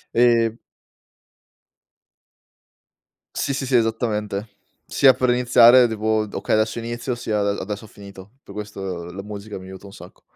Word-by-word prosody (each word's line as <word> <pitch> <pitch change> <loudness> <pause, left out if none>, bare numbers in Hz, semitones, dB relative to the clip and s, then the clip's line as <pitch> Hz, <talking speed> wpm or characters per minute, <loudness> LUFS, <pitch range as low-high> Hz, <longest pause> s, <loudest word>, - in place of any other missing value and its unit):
Ehm 115 -1 +3 2.8
Sì, 140 - -1
sì, 135 0 -3
sì 130 - +1
esattamente, 110 -3 -1 0.4
sia 135 -1 +5
per 125 -1 0
iniziare 125 0 +6
devo 110 0 -1
d: 100 - -14
"Okay - - -1
adesso 110 +2 0
inizio 120 +2 -4
sia 110 -3 -2
a 100 0 -1
adesso 105 +2 -6
ho - - -14
finito." 100 0 -13
Per - - -13
questo 95 -4 -6
la 95 +2 -8
musica 105 0 -8
mi 95 - -12
aiuta 95 +1 -11
un 100 - -12
sacco. - - -14
110 Hz, 150 wpm, -21 LUFS, 100-120 Hz, 2.8 s, iniziare